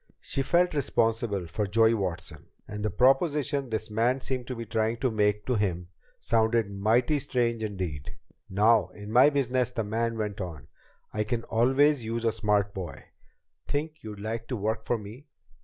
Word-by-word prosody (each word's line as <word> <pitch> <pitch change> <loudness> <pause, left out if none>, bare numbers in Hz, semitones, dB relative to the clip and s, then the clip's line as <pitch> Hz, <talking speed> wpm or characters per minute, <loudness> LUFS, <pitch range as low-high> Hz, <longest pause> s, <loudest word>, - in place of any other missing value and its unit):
She 135 - -2
felt 175 +6 +2
responsible 115 - 0
for 100 +5 -2
Joey 110 +3 +4
Watson, 90 -5 -4 0.2
and 105 0 -6
the 105 - +1
proposition 140 - +2
this 110 -1 -3
man 120 +5 +2
seemed 130 -2 -4
to 130 - -4
be 115 0 -6
trying 110 +1 0
to 130 +1 0
make 105 -1 +1
to 130 - 0
him 90 -5 -1 0.3
sounded 110 -2 +1
mighty 115 +9 +2
strange 120 -4 -1
indeed! 90 -9 -4 0.3
"Now 105 0 +4
in 105 0 -8
my 125 +5 +7
business," 130 -3 0
the 120 -2 -2
man 115 +2 -1
went 105 -2 -3
on, 80 -8 -7 0.5
"I 105 - 0
can 115 +1 -2
always 130 +4 +3
use 115 +1 -3
a 115 - +3
smart 105 -2 +1
boy. 90 -4 -7 0.6
Think 155 +2 -2
you'd 105 -2 -8
like 115 +2 -4
to 130 - -3
work 110 +1 -2
for 120 - +1
me? 110 +8 -11
115 Hz, 175 wpm, -28 LUFS, 105-125 Hz, 0.6 s, my